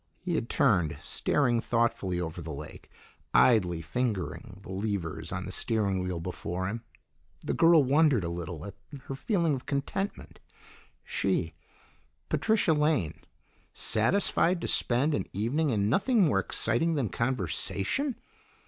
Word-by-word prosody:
He 175 -1 -3
had 120 -7 -1
turned, 95 - +2
staring 120 -5 +1
thoughtfully 115 -7 0
over 85 0 -4
the 80 0 -6
lake, 75 +1 -9 0.5
idly 90 -9 +4
fingering 90 - -3
the - - -9
levers 95 -4 -3
on - - -3
the - - -6
steering 100 -4 0
wheel 90 -2 -3
before 90 +2 -4
him. 115 +3 -4 0.6
The - - -2
girl 165 -2 +6
wondered 140 - +3
a 85 - -2
little 85 -1 -5
at 100 - -7 0.3
her - - -6
feeling 170 - +1
of 130 -2 -5
contentment; 145 +8 -3 0.6
she, - - -1 0.8
Patricia 220 -7 +2
Lane, 150 - +1 0.5
satisfied 175 - +2
to - - -2
spend 130 +6 +2
an - - -1
evening 130 - 0
in 105 -5 +1
nothing 205 - +3
more 135 -11 +3
exciting 120 +11 0
than 130 -8 0
conversation! 120 - -1
115 Hz, 135 wpm, -29 LUFS, 90-150 Hz, 0.8 s, girl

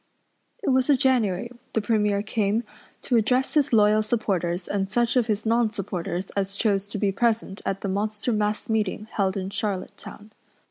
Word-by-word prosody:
It - - 0
was 260 +1 +2
a 285 - +6
January 240 -5 +1 0.2
the - - +2
Premier 210 -2 +1
came, 215 +1 0 0.4
to 245 - +2
address 250 +4 +1
his 290 -2 +2
loyal 215 -1 +5
supporters 190 -6 -1
and 195 -1 -1
such 240 +3 +1
of 245 -3 +3
his 215 -1 -1
nonsupporters 200 -5 -1
as 195 0 -1
chose 200 -2 0
to 210 - -4
be 200 -1 +1
present 220 -1 0
at 195 0 -2
the - - -2
monster 210 +4 -1
mass 210 0 -1
meeting 215 -2 -1
held 195 -1 0
in 190 0 -4
Charlottetown. 205 +1 -5
210 Hz, 170 wpm, -25 LUFS, 195-230 Hz, 0.4 s, a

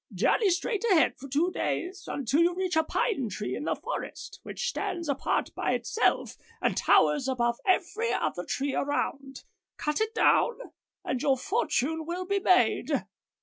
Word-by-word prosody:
Journey 425 -4 +2
straight 390 +4 -1
ahead 345 -6 +4
for 275 - -8
two 305 +7 +1
days, 365 +1 -3
until 280 +3 0
you 345 +1 +3
reach 370 -1 -1
a 320 - +4
pine 350 - -1
tree 205 +1 -4
in - - -5
the - - 0
forest, - - -6
which 485 - -4
stands 345 -8 -3
apart 280 -1 -1
by - - -1
itself, 460 - 0 0.2
and - - 0
towers 290 -3 +3
above 240 -2 0
every 405 +5 +1
other - - -1
tree 280 0 -2
around. 275 -1 -2 0.3
Cut 300 +6 -1
it 440 +1 -1
down 480 - +3 0.5
and 250 - -2
your 270 -2 +3
fortune 320 - -1
will 360 +2 -3
be 400 +1 0
made. 370 -1 +2
335 Hz, 160 wpm, -28 LUFS, 275-385 Hz, 0.5 s, ahead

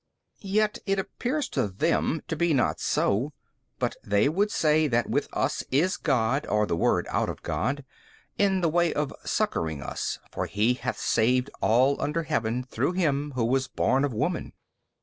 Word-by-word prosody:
B. 200 - -10
Yet 215 +2 +1
it 195 0 +2
appears 255 +9 -2
to 130 -6 0
them 155 - 0
to 170 - -2
be 165 -1 +2
not 120 -4 +1
so, 125 +9 0 0.4
but - - -1
they 100 +4 +2
would 195 +8 +1
say 155 -4 +3
that 120 -3 +1
with - - +1
us - - -1
is 165 +8 +2
God 130 0 0
or 105 0 +2
the 85 - -1
Word 85 - +2
out - - 0
of - - -7
God, 140 +3 -2 0.5
in 195 -2 +2
the 170 - +3
way 170 +1 +2
of 150 -1 -1
succouring 80 -3 -1
us: - - -3
for - - -3
He 110 +4 +2
hath 125 0 -4
saved 125 +4 +1
all 130 +5 +3
under 165 +3 -1
heaven 115 -3 -1
through 130 +6 -1
him 150 -5 0
who 120 -3 +1
was 130 +2 +1
born 135 +2 +1
of 145 - 0
woman. 150 +10 -2
140 Hz, 180 wpm, -27 LUFS, 120-165 Hz, 0.5 s, say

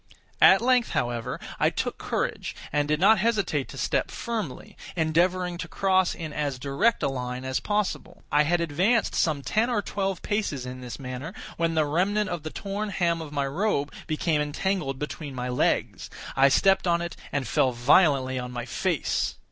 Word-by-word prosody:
At - - +7
length, 250 -2 +3
however, 120 -1 -2 0.2
I - - +4
took - - -3
courage, - - -2 0.2
and 145 0 +1
did 150 0 +1
not 205 +4 +6
hesitate 195 - 0
to 135 - -10
step 120 - 0
firmly; 220 - -5 0.2
endeavoring 175 +2 +1
to - - -4
cross 190 -1 +2
in 160 -3 -6
as 145 -3 -2
direct 140 - +1
a - - +3
line 125 -1 -4
as 130 0 0
possible. 210 -1 -2
I 145 - +5
had 170 +3 +2
advanced 185 +9 +1
some 150 -4 +1
ten 220 - +1
or 220 -4 0
twelve 195 -2 -2
paces 200 -12 -1
in 130 0 -7
this 125 -1 -7
manner, 135 +6 -6 0.2
when 165 -1 0
the 155 -1 +3
remnant 195 +7 +1
of 175 -2 -3
the 155 - -5
torn 200 +4 -4
hem 170 -4 0
of 155 -2 -7
my 140 -1 -1
robe 145 0 -1
became 155 -1 0
entangled 150 -1 -1
between 150 -1 -6
my 125 0 -3
legs. 125 - 0 0.3
I 135 +1 +6
stepped 190 +6 +3
on 170 0 +2
it, 170 - -5 0.2
and 140 -2 -1
fell 130 - +2
violently 130 +1 +3
on 125 0 -5
my 120 -1 -5
face. 170 +4 -1
160 Hz, 180 wpm, -26 LUFS, 135-190 Hz, 0.3 s, At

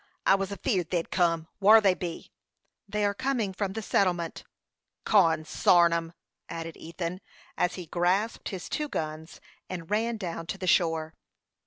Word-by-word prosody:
I - - +6
was 195 -1 0
afeerd 200 - -1
they'd 170 -2 -2
kim. 165 -3 +1
Whar 215 +3 +8
be 200 -3 +4
they?" 170 0 -6 0.6
"They 210 0 0
are 200 - +1
coming 240 -4 -1
from 195 0 -2
the 220 +1 -4
settlement." 175 -5 0 0.6
"Consarn 170 +2 +4
'em!" 165 0 -2 0.4
added 165 -1 -6
Ethan, 170 +3 -5 0.3
as 180 0 0
he 180 - -7
grasped 180 +7 0
his 185 -3 -6
two 300 -1 -2
guns, 155 - -5 0.3
and 170 -2 -6
ran 225 +2 +1
down 170 -4 -5
to 195 - -4
the 190 - -5
shore. 165 -3 +2
180 Hz, 155 wpm, -28 LUFS, 165-200 Hz, 0.6 s, Whar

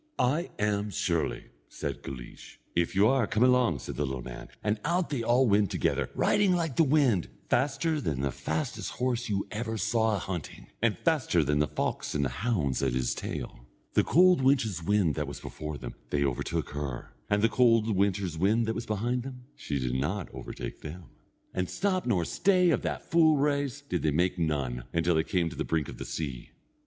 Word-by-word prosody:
"I 150 +8 +1
am 105 0 0
surely," 85 -4 -1 0.2
said - - -5
Guleesh. 65 -3 -9 0.2
"If 85 +2 +1
you 100 +2 +5
are, 130 -4 +3
come 110 - +2
along," 125 - +4
said 65 - -7
the 75 - +1
little 65 -2 -4
man, 60 -1 -8 0.2
and 105 0 0
out 170 +2 0
they 140 - 0
went 115 - -3
all 115 -5 +4
together, - - 0
riding 200 -3 +3
like 165 -6 -1
the 165 - +5
wind, 135 - +3 0.2
faster 145 +3 +1
than 70 - -1
the 70 -1 0
fastest 80 +5 -3
horse 125 -2 -1 0.2
ever 110 +2 -3
you - - -2
saw 110 0 +1
a - - 0
hunting, 90 -5 -6
and 110 -5 +2
faster 145 - +2
than 75 +1 +1
the 75 - +3
fox - - -2
and 70 -1 +1
the - - 0
hounds 75 - -1
at - - +1
his 65 -1 0
tail. - - -6 0.3
The - - +4
cold 180 -3 +5
winter's 120 - +2
wind 95 -2 +2
that 75 -1 -2
was 70 - -7
before 75 -1 -6
them, 60 -3 -7 0.2
they 70 -1 +1
overtook 65 -3 -2
her, 70 -4 -5 0.2
and 105 0 +2
the - - +7
cold 115 -3 +3
winter's 95 -4 0
wind 110 +6 +3
that 110 - -1
was 115 +1 -5
behind 120 +4 -1
them, 125 0 -8
she 70 - -3
did 65 -2 -1
not 80 +9 -1
overtake - - -7
them. 85 +3 -9 0.4
And 90 -1 -1
stop 185 -5 0
nor 90 -8 +2
stay 180 - +3
of - - +1
that - - -4
full 160 -2 +5
race, 145 -1 0
did 145 - -3
they 80 - +2
make 85 +5 +1
none, 70 -7 -1
until 85 +1 +2
they 80 0 +2
came 85 +1 0
to - - -8
the - - -2
brink 80 -3 -1
of - - -9
the - - -5
sea. 70 -6 -5
105 Hz, 205 wpm, -29 LUFS, 75-125 Hz, 0.4 s, the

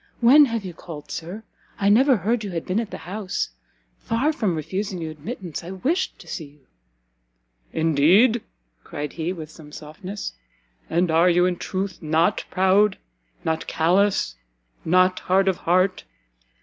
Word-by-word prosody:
when 275 +5 +7
have 230 -5 -3
you 180 - -6
called, 155 -3 -10
Sir? 175 +7 -6 0.4
I 200 - +1
never 255 +5 +5
heard 215 +5 0
you 205 - -4
had 170 -3 -4
been 185 +4 0
at 230 -3 -3
the - - -6
house. 195 +1 -3 0.5
Far 260 +8 0
from 205 - 0
refusing 185 +4 -3
you 160 -1 -4
admittance, 170 - -7
I 170 - -8
wished 270 - -1
to - - -15
see 160 - -5
you." 145 0 -19 1.1
"Indeed?" 170 - +4 0.4
cried 145 0 -6
he, 165 +1 -2
with 160 -4 -7
some 155 -2 -14
softness, 180 +7 -7 0.6
"and 170 +1 +1
are 165 +3 +5
you, 175 +1 +4
in 180 -1 0
truth, 190 +1 -4
not 160 +5 +1
proud? 190 +2 +3 0.5
not 160 0 -1
callous? 185 - +2 0.5
not 185 +2 +3
hard 190 +1 +2
of 190 -2 +2
heart? 185 +2 +1
185 Hz, 155 wpm, -23 LUFS, 165-205 Hz, 1.1 s, when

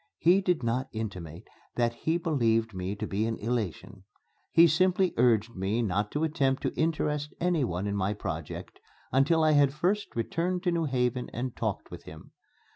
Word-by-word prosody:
He 180 +4 +4
did 180 -7 0
not 125 +3 -1
intimate 95 -5 -6 0.3
that 120 -1 +1
he 160 +8 -1
believed 115 -9 +1
me 95 +2 -3
to - - -4
be 105 +3 -1
in 115 - -2
elation. 105 -4 -3 0.5
He 165 +1 +7
simply 180 +2 +3
urged 115 -1 +2
me 100 +5 0
not 105 0 0
to 150 - 0
attempt 140 -4 0
to - - -1
interest 150 -2 -1
anyone 135 - 0
in 100 0 -1
my 100 +1 0
project 80 -6 -6 0.3
until 155 +5 +3
I 155 - +4
had 145 -2 +4
first 200 +6 -1
returned 175 +10 -1
to 180 - +2
New 170 -1 0
Haven 125 -2 -1
and 125 +1 -4
talked - - -3
with - - -10
him. - - -12
125 Hz, 175 wpm, -28 LUFS, 110-160 Hz, 0.5 s, He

